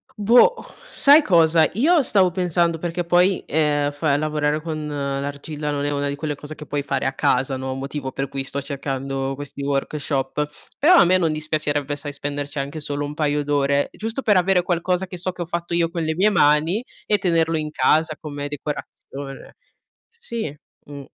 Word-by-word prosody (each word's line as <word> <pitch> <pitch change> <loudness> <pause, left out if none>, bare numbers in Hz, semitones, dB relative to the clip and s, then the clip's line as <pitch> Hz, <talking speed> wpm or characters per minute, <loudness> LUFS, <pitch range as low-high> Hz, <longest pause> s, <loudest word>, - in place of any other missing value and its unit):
boh, 235 - +5 0.3
sai 290 +3 +5
cosa, 165 - +4
io 305 - +4
stavo 190 -7 +3
pensando 170 -2 0
perché 175 +1 -2
poi, 180 +2 +3
ehm, 145 -1 +1
fa 145 -1 0
lavorare 150 0 0
con 155 -1 -5
l'argilla 145 +1 -4
non 145 0 -2
è 145 - 0
una 145 0 -1
di 140 - -2
quelle 150 0 -3
cose 150 +2 -9
che 150 - -10
puoi 145 0 -2
fare 140 - -2
a 135 - 0
casa, 130 +1 +1
no, 130 0 -4
motivo 135 0 -5
per 135 +1 -3
cui 135 0 -4
sto 140 +1 -3
cercando 135 -1 -3
questi 145 0 -8
workshop, 140 0 -2 0.3
però 350 +6 +6
a - - +7
me 185 +1 +4
non 165 -3 +1
dispiacerebbe, 150 -2 -1
sai, 145 0 -6
spenderci 145 +1 -5
anche 140 +3 -4
solo 145 0 -3
un 145 - -6
paio 150 -1 0
d'ore, 140 -1 +1
giusto 225 +5 -4
per 210 -4 +4
avere 180 0 +3
qualcosa 180 +1 0
che 180 - -8
so 185 +2 -1
che 180 -1 -5
ho - - -8
fatto 170 0 -4
io 170 -1 +2
con 170 -1 -4
le 160 0 -1
mie 200 +4 +4
mani 160 +6 +3 0.2
e 210 - +2
tenerlo 165 -3 +1
in 155 0 -3
casa 155 0 +2
come 145 -2 -5
decorazione. 140 -1 -7 0.5
S 465 - -23
sì. 220 - -4 0.3
Mh. 140 -1 -9
150 Hz, 190 wpm, -22 LUFS, 145-175 Hz, 0.5 s, a